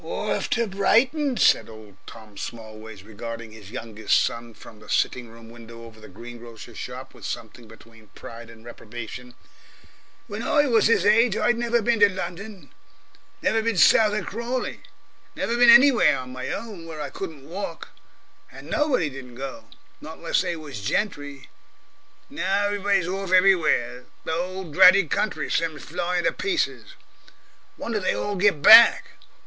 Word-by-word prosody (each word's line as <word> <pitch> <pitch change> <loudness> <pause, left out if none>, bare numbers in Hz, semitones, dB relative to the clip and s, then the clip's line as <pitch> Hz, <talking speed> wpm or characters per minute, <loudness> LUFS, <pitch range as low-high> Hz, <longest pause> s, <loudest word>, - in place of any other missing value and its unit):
"Orf - - -3
to 235 0 +1
Brighton!" 245 +8 +1
said - - +3
old 110 -3 -14 0.4
Smallways, 110 -1 -9
regarding 115 +2 -8
his 105 -3 -13
youngest 110 -1 -1
son 115 -1 -4
from 110 - -15
the - - -17
sitting 125 -2 -1
room 115 0 -15
window 115 0 -13
over 115 -1 -14
the 110 - -13
green 120 +5 -11
grocer's 115 -2 -12
shop - - -8
with - - -17
something 120 -2 -7
between 115 0 -18
pride 115 0 -11
and 115 0 -16
reprobation. 120 +1 -10 0.9
"When 205 +2 -7
I 290 +4 +2
was 230 -4 +3
'is - - +2
age, 220 +1 +3
I'd 240 - +2
never 235 -1 0
been 235 +1 +1
to 205 -1 +6
London, 190 +2 -8 0.7
never 225 - +1
bin 225 -2 -2
south 210 +4 +5
of 210 -4 -3
Crawley 240 +3 -4 0.6
never 235 - -2
bin 240 0 +5
anywhere 270 0 +6
on 125 0 -8
my 130 0 -6
own 200 -6 -7
where 160 -2 -8
I 150 - -5
couldn't 160 -8 -8
walk. 190 +5 -7 0.6
And - - -12
nobody 290 - +1
didn't 130 -3 -10
go. 135 - -8 0.4
Not - - -10
unless - - 0
they 175 -2 -3
was 145 -9 -9
gentry. 145 - -3 0.8
Now 195 +2 -1
every 205 0 -2
body's 195 -3 +1
orf 190 0 -4
everywhere; 165 -10 +2 0.2
the - - -3
whole 180 0 -5
dratted 185 +1 +6
country 215 - -2
sims 160 -3 -2
flying 175 +2 -2
to - - +2
pieces. 365 -3 -3 0.8
Wonder 225 -2 -3
they 185 - -1
all 205 - -3
get 190 -6 +1
back. 225 +2 +8
170 Hz, 160 wpm, -23 LUFS, -, 0.9 s, back